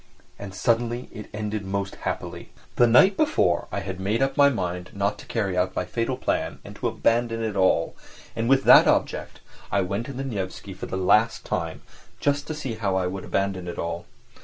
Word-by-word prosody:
And 95 -2 -8
suddenly 120 +3 0
it 105 - -9
ended 105 -1 -3
most 100 0 -3
happily. - - -5 0.3
The 120 - +5
night 190 - +6
before 90 - +2
I 100 - -2
had 95 -1 -5
made 105 +7 +1
up 135 - 0
my 140 0 +6
mind 90 -7 -3
not 100 +1 -1
to - - -12
carry 100 -5 -1
out 90 +1 0
my 90 - -1
fatal 120 +5 -2
plan - - -1
and - - -10
to - - -1
abandon 115 -1 +1
it 110 -2 -2
all, 95 -1 +2 0.4
and 115 +1 -1
with 135 0 +4
that - - +8
object - - 0 0.3
I 100 - +2
went 100 +5 -2
to 140 - -6
the 135 +2 -4
Nevsky 100 -5 -5
for 95 - -7
the 95 - -3
last 105 +5 +3
time, - - -3 0.4
just 145 0 0
to 155 - -3
see 135 -6 -4
how 105 -4 -1
I 95 -1 +1
would 95 +1 -4
abandon 95 -2 -1
it 85 - -5
all. 85 0 -4
105 Hz, 205 wpm, -25 LUFS, 95-120 Hz, 0.4 s, that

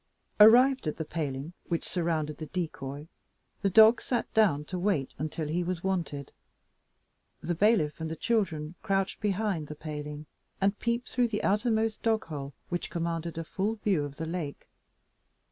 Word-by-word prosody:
Arrived 250 - +7
at 155 - -2
the 160 - -3
paling 150 0 -4
which 170 -2 -1
surrounded 160 -4 -1
the 155 - -5
decoy, 145 -4 -4 0.5
the 200 - +2
dog 220 +4 +7
sat 240 -2 -2
down 185 -10 +3
to 180 +4 -4
wait 175 -8 0
until 155 +1 -3
he 170 +4 0
was 175 -1 -3
wanted. 170 -7 -2 1.1
The 175 - -1
bailiff 175 -5 +2
and 160 - -2
the 160 - -4
children 165 -7 0
crouched 195 -2 0
behind 200 -6 0
the 150 - -7
paling, 150 -1 -6 0.3
and 195 +1 +1
peeped 235 +1 -1
through 245 -1 +2
the 215 -2 -3
outermost 220 +1 +1
dog 225 -1 +1
hole, 140 -4 -6
which 175 0 -2
commanded 170 -1 -3
a 165 - -2
full 200 +6 -2
view 200 -8 +1
of 140 -1 -7
the 160 - -3
lake. 160 -3 -5
170 Hz, 160 wpm, -29 LUFS, 155-210 Hz, 1.1 s, Arrived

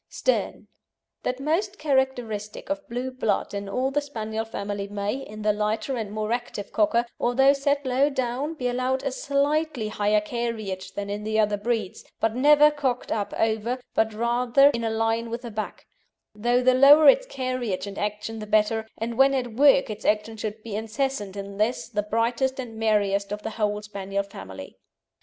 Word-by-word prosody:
STERN - - -1 0.5
That 250 +1 -2
most 360 +8 -1
characteristic 260 - -1
of 295 0 -4
blue 250 +2 -3
blood 255 -6 -1
in 200 0 -4
all 255 +6 0
the 290 +1 +1
Spaniel 220 -5 -4
family 200 -2 -4
may, 205 0 -2
in 215 -6 -8
the 210 0 +3
lighter 215 +5 -1
and 220 -4 -4
more 215 +1 -3
active 240 -4 -3
Cocker, 230 +2 +2
although 270 +3 +4
set 280 0 0
low 260 +3 +3
down, 265 +3 -2
be 250 -5 -2
allowed 255 +2 -1
a 275 - -1
slightly 280 -3 0
higher 210 0 +2
carriage 215 -4 -4
than 200 0 -4
in 205 +1 -4
the 220 +1 0
other 210 -1 +3
breeds, 215 -2 -2 0.2
but 225 -1 +1
never 295 +3 +6
cocked 265 -4 -2
up 205 -2 -1
over, 225 +3 0
but 220 0 +2
rather 240 +5 +3
in 235 -3 -3
a 225 - 0
line 225 +1 0
with 235 +2 -5
the 235 - -6
back, 215 0 -5 0.5
though 240 +4 +1
the 255 0 +5
lower 285 +4 +8
its - - +6
carriage 255 - -3
and 200 -1 -7
action 210 +2 -3
the 215 - -7
better, 215 +1 +2
and 230 +2 -4
when 270 0 +6
at 245 -3 -2
work 275 -1 +5
its 210 +1 -7
action 210 +1 +1
should 215 0 -5
be 220 -3 -5
incessant 220 -2 -2
in 200 0 -7
this, 220 +4 0
the 210 -3 -1
brightest 235 +5 0
and 240 -3 -6
merriest 205 -2 +1
of 210 0 -4
the 220 - -3
whole 210 -1 -1
Spaniel 200 -1 -3
family. 95 - -10
225 Hz, 185 wpm, -25 LUFS, 210-260 Hz, 0.5 s, lower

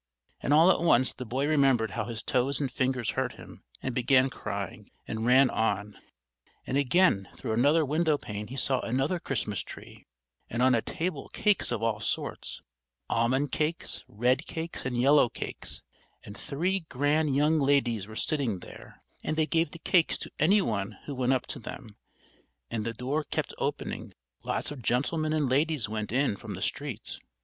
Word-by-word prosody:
And - - -1
all 160 +5 +7
at - - +1
once 130 -7 +4
the 125 - -7
boy 130 +5 0
remembered 135 -7 +3
how 110 -2 -2
his 115 -1 -5
toes 130 +2 +1
and 140 -4 -1
fingers 130 -3 0
hurt 130 -1 -1
him, - - -13 0.2
and 130 - -2
began 130 +2 +3
crying, - - -5 0.2
and 110 +1 -2
ran 130 +1 +6
on; 105 -2 -1 0.7
and - - -2
again 140 - +3
through - - -4
another 145 +7 +4
window 155 +1 +2
pane 105 -4 -6
he 130 - -8
saw 130 -1 +1
another 135 +10 0
Christmas 110 - -2
tree, - - -11 0.4
and 120 +2 0
on 130 0 +5
a 115 - +3
table 165 -1 -3
cakes 210 - +2
of 115 -2 -2
all 115 -2 +1
sorts 100 - -3 0.5
almond 130 +5 +1
cakes, 155 +2 -2
red 125 +7 +1
cakes 165 -4 -4
and 125 -1 -2
yellow 135 0 +5
cakes, - - -3 0.4
and 100 - -9
three 180 - -1
grand 145 +2 +1
young 150 +3 +3
ladies 130 -7 +2
were 110 - -10
sitting 130 - 0
there, - - -12 0.2
and 155 - -2
they 160 - +3
gave 165 0 +1
the 170 - -9
cakes 165 0 +3
to - - -7
any 195 +6 +5
one 105 - -2
who 145 - -5
went 130 -1 +1
up 130 -2 +1
to - - -6
them, 110 -1 -9 0.8
and 110 -2 -2
the 115 - -2
door 135 +6 -2
kept - - -3
opening, - - -3 0.3
lots - - -2
of 145 -4 -7
gentlemen 155 +7 0
and 155 -3 +1
ladies 145 -1 +1
went 110 0 -4
in 130 -3 +2
from - - -7
the - - -8
street. - - -3
130 Hz, 180 wpm, -28 LUFS, 115-150 Hz, 0.8 s, all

